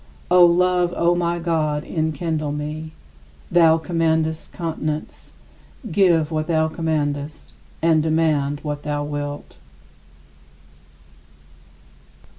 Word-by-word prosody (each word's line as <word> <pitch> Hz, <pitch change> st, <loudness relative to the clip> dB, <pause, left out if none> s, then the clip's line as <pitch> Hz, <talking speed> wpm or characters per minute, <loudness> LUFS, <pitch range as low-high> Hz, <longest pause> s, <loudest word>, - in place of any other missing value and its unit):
O 180 Hz, 0 st, +7 dB
Love, 180 Hz, 0 st, +3 dB
O 170 Hz, +1 st, +3 dB
my 175 Hz, 0 st, 0 dB
God, 155 Hz, -3 st, -1 dB
enkindle 155 Hz, -1 st, -2 dB
me! 150 Hz, +2 st, -5 dB, 0.6 s
Thou 165 Hz, -2 st, +5 dB
commandest 160 Hz, -1 st, -1 dB
continence; 155 Hz, -2 st, -5 dB, 0.6 s
give 170 Hz, -5 st, +3 dB
what 155 Hz, 0 st, -2 dB
thou 160 Hz, -1 st, +2 dB
commandest, 150 Hz, -2 st, -3 dB, 0.3 s
and 160 Hz, -1 st, +4 dB
command 155 Hz, -3 st, +1 dB
what 145 Hz, -1 st, -4 dB
thou 145 Hz, 0 st, -2 dB
wilt. 145 Hz, 0 st, -6 dB
160 Hz, 90 wpm, -21 LUFS, 150-170 Hz, 0.6 s, O